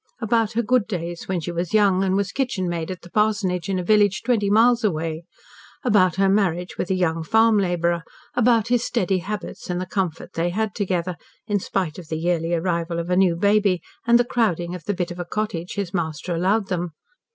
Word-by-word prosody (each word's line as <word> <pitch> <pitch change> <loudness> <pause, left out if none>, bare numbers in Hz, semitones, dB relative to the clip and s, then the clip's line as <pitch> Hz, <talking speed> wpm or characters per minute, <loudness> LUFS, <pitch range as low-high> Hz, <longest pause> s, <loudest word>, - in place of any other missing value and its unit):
About 225 -1 +1
her 235 +2 +1
good 245 -1 +2
days, 175 -4 -5
when 185 -2 -1
she 175 - -4
was 170 +3 -2
young, 195 -3 +4
and 190 -1 +1
was 200 0 0
kitchenmaid 185 -11 -2
at 185 -1 -6
the 175 - -12
parsonage 205 -5 0
in 190 - 0
a 180 - -2
village 205 0 +3
twenty 230 -4 +1
miles 235 +3 +4
away; 165 -4 -1 0.6
about 195 -8 +3
her 195 +1 +3
marriage 185 -3 +1
with - - -3
a 190 - +2
young 165 -3 0
farm 220 +3 +4
labourer; 175 -2 0 0.3
about 235 -2 +3
his 245 -1 +2
"steady" 190 -5 0
habits, 200 0 -6
and 180 0 -1
the 185 - -3
comfort 185 -4 -3
they 170 +1 0
had 215 +2 -1
together, 180 -4 -2 0.3
in 205 -2 0
spite 185 -4 -2
of 170 - -11
the 160 - -3
yearly 165 0 0
arrival 170 0 -1
of 170 +1 -3
a - - +3
new 185 -2 +4
baby, 200 0 +3 0.3
and 235 0 +7
the 240 - +2
crowding 180 -8 0
of 180 -3 -8
the 205 - -1
bit 175 -1 -2
of 175 - -8
a - - -1
cottage 175 -2 -3
his 200 -3 -3
master 170 0 -2
allowed 195 +5 +1
them. 175 -3 -3
185 Hz, 210 wpm, -23 LUFS, 175-210 Hz, 0.6 s, and